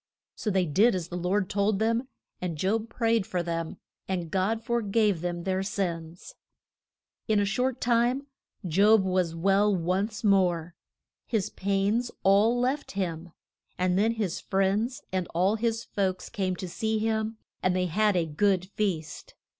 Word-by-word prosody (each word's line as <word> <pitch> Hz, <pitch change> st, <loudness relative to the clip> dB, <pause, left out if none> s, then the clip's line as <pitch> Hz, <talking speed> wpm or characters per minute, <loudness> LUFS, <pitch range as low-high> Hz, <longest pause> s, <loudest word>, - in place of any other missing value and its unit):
So 215 Hz, -, -3 dB
they 190 Hz, -2 st, +2 dB
did 195 Hz, +9 st, +3 dB
as 175 Hz, -2 st, -4 dB
the 175 Hz, -, -5 dB
Lord 185 Hz, +2 st, 0 dB
told 200 Hz, +1 st, +1 dB
them, 230 Hz, +4 st, 0 dB, 0.3 s
and 175 Hz, -3 st, -3 dB
Job 215 Hz, +7 st, 0 dB
prayed 225 Hz, -3 st, +1 dB
for 180 Hz, -1 st, -1 dB
them, 165 Hz, -1 st, -3 dB, 0.3 s
and 175 Hz, -4 st, -3 dB
God 210 Hz, +4 st, 0 dB
for 235 Hz, +1 st, 0 dB
gave 205 Hz, -4 st, +1 dB
them 175 Hz, -1 st, -3 dB
their 190 Hz, 0 st, 0 dB
sins. 175 Hz, -4 st, -4 dB, 0.9 s
In 215 Hz, -1 st, +3 dB
a 205 Hz, -, +2 dB
short 250 Hz, +5 st, 0 dB
time 245 Hz, +3 st, +2 dB, 0.4 s
Job 200 Hz, +5 st, +5 dB
was 185 Hz, -3 st, 0 dB
well 195 Hz, +4 st, +3 dB
once 190 Hz, +6 st, -1 dB
more. 180 Hz, -5 st, +2 dB, 0.5 s
His 220 Hz, -6 st, -1 dB
pains 200 Hz, +5 st, 0 dB
all 210 Hz, +5 st, +4 dB
left 265 Hz, +4 st, -1 dB
him; 175 Hz, -3 st, -3 dB, 0.5 s
and 180 Hz, 0 st, +1 dB
then 215 Hz, +4 st, +3 dB
his 200 Hz, -6 st, -2 dB
friends 200 Hz, +6 st, 0 dB
and 185 Hz, -2 st, -1 dB
all 185 Hz, +4 st, +3 dB
his 225 Hz, 0 st, -1 dB
folks 190 Hz, -2 st, -2 dB
came 190 Hz, -5 st, -1 dB
to 185 Hz, -, -6 dB
see 220 Hz, +5 st, -1 dB
him 220 Hz, 0 st, -1 dB, 0.2 s
and 185 Hz, 0 st, +1 dB
they 185 Hz, 0 st, +1 dB
had 210 Hz, +4 st, +2 dB
a 170 Hz, -, +1 dB
good 185 Hz, +4 st, +1 dB
feast. 175 Hz, -8 st, -3 dB
195 Hz, 160 wpm, -27 LUFS, 180-220 Hz, 0.9 s, Job